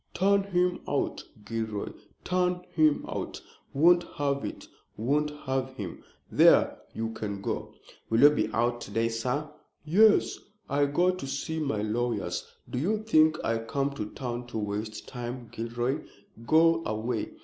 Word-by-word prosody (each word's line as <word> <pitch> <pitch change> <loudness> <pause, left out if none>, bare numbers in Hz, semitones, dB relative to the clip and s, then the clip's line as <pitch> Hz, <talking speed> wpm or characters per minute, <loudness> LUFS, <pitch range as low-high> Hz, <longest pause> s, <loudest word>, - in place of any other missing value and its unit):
Turn 200 +2 +4
him 180 -2 +1
out, - - -1 0.2
Gilroy, 110 -2 -3 0.3
turn 180 0 0
him 155 -2 +3
out! - - -4 0.3
Won't 175 +5 +5
have 140 -1 0
it, - - -6 0.3
won't 145 +7 +1 0.2
have 130 0 -1
him! 95 -7 -7 0.3
There! - - +6 0.2
you 115 0 -2
can 105 -3 -4
go." 100 - -4 0.3
"Will 115 +1 +3
you 145 +1 +9
be 150 - +1
out 120 +1 0
to - - -7
day, 115 +3 +1
sir?" 125 +6 -2 0.4
"Yes, 210 +7 +4 0.3
I 145 0 +2
go 175 +6 +3
to 180 -7 -6
see 160 +4 -3
my 135 -9 -1
lawyers. 105 -5 -1 0.2
Do 125 - -3
you 210 +8 0
think 155 -7 +4
I 115 0 +1
come 135 +5 -1
to 125 -7 -4
town 120 -2 -5
to 120 - -5
waste 105 +1 -4
time, 120 -1 -6
Gilroy? 120 +4 -2 0.4
Go 165 +1 +5
away." 110 0 -2
130 Hz, 150 wpm, -28 LUFS, 115-160 Hz, 0.4 s, you